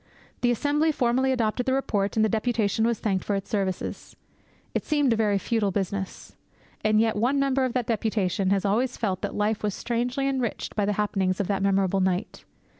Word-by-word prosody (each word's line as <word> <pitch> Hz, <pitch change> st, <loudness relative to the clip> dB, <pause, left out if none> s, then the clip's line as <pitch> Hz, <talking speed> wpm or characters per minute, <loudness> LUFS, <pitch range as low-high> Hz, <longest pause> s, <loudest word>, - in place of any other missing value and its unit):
The 245 Hz, -, +3 dB
Assembly 290 Hz, +6 st, +2 dB
formally 260 Hz, -1 st, +1 dB
adopted 245 Hz, 0 st, 0 dB
the 260 Hz, -, +2 dB
report, 205 Hz, -7 st, 0 dB
and 220 Hz, -1 st, +4 dB
the -, -, +3 dB
deputation 220 Hz, 0 st, +1 dB
was 235 Hz, -1 st, +1 dB
thanked 195 Hz, -4 st, -1 dB
for 205 Hz, -, -1 dB
its 195 Hz, +3 st, -5 dB
services. 195 Hz, -4 st, -3 dB, 0.6 s
It -, -, -1 dB
seemed 290 Hz, -5 st, +2 dB
a -, -, +1 dB
very 210 Hz, -2 st, +2 dB
futile 210 Hz, +1 st, 0 dB
business. 195 Hz, 0 st, -4 dB, 0.5 s
And 215 Hz, 0 st, +3 dB
yet 225 Hz, 0 st, +2 dB
one 250 Hz, +7 st, +1 dB
member 270 Hz, -1 st, +2 dB
of 250 Hz, -, -2 dB
that 250 Hz, -2 st, 0 dB
deputation 205 Hz, -4 st, 0 dB
has 195 Hz, 0 st, +1 dB
always 235 Hz, +6 st, +1 dB
felt 190 Hz, -5 st, -1 dB
that -, -, -3 dB
life 210 Hz, +1 st, 0 dB
was 210 Hz, -2 st, -1 dB
strangely 245 Hz, +3 st, -1 dB
enriched 260 Hz, -4 st, -2 dB
by 210 Hz, -, +1 dB
the 205 Hz, -, +1 dB
happenings 195 Hz, -3 st, 0 dB
of 200 Hz, -, +1 dB
that 200 Hz, -1 st, 0 dB
memorable 195 Hz, -1 st, +2 dB
night. 185 Hz, +2 st, -1 dB
215 Hz, 195 wpm, -26 LUFS, 200-245 Hz, 0.6 s, and